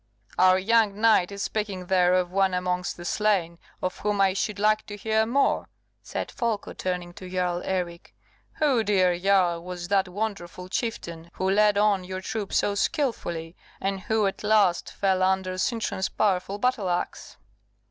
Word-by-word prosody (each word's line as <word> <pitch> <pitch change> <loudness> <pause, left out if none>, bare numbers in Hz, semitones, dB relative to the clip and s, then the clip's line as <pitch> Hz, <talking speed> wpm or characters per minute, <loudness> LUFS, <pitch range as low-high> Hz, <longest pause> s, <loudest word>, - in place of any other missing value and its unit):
"Our 185 0 +6
young 210 +1 +2
knight 215 -5 +4
is 200 0 -4
speaking 205 -4 -3
there 180 -1 +3
of 180 -1 0
one 190 -1 +2
amongst 180 0 -2
the 175 - -9
slain 180 -5 0 0.2
of 185 - -2
whom 210 -1 -1
I 195 -1 +4
should 205 +1 -2
like 215 +1 +2
to 205 - -7
hear 220 +1 +1
more," 275 +4 +1 0.3
said - - -5
Folko, 230 -4 -2
turning 180 -1 -4
to 185 +1 -10
Jarl 180 -1 -1
Eric. 175 -2 -4 0.4
"Who, 270 -7 +2
dear 185 -4 +3
Jarl, 180 -3 +2
was 180 0 -6
that 195 -1 +2
wonderful 185 -2 -5
chieftain 170 -8 -4
who 190 - -1
led 210 0 +4
on 205 -2 +3
your 185 +1 -5
troops 210 +1 -2
so 205 - +1
skilfully, 190 - -2 0.2
and 195 0 -2
who 220 +1 +1
at 195 - -3
last 210 -5 +2
fell 190 -2 +1
under 190 0 +1
Sintram's 215 -3 -1
powerful 195 -1 0
battle 235 -4 0
axe?" 175 0 -3
190 Hz, 165 wpm, -26 LUFS, 180-210 Hz, 0.4 s, Our